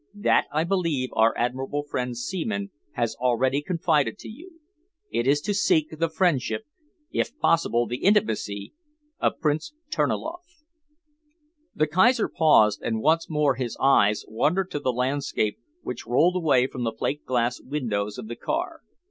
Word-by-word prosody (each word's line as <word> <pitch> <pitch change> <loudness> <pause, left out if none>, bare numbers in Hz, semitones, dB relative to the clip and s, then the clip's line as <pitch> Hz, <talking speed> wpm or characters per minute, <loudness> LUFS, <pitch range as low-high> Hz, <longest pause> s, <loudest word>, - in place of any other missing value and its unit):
That, 205 - +2
I 155 +2 +1
believe, 165 -8 0
our 115 +1 +3
admirable 130 +4 -2
friend 125 -4 -3
Seaman 200 - -3 0.2
has 115 -3 -1
already 130 +3 +1
confided 155 - 0
to - - -10
you. 330 +9 -13 0.5
It 120 - 0
is 145 +2 +4
to 205 - -1
seek 160 -6 +2
the 165 0 +1
friendship, 160 - 0 0.5
if 255 - -2
possible 140 - +2
the 120 - -4
intimacy, 110 - +1 0.5
of - - 0
Prince 155 - -1 0.2
Terniloff." 350 0 -3 1.1
The 155 - +2
Kaiser 210 - +3
paused, 110 -10 +4
and 110 -1 -1
once 165 +7 +2
more 150 -3 +2
his 125 -2 -4
eyes 105 -6 +3
wandered 175 - 0
to 145 - -2
the 130 -3 0
landscape 125 -3 -1 0.2
which - - -6
rolled 155 +10 +3
away 145 -8 +3
from 130 -2 -5
the 115 - 0
plate 145 +6 -3
glass 125 -1 0
windows 105 -8 -3
of - - -7
the 120 - -6
car. 335 - -3
145 Hz, 150 wpm, -25 LUFS, 120-180 Hz, 1.1 s, is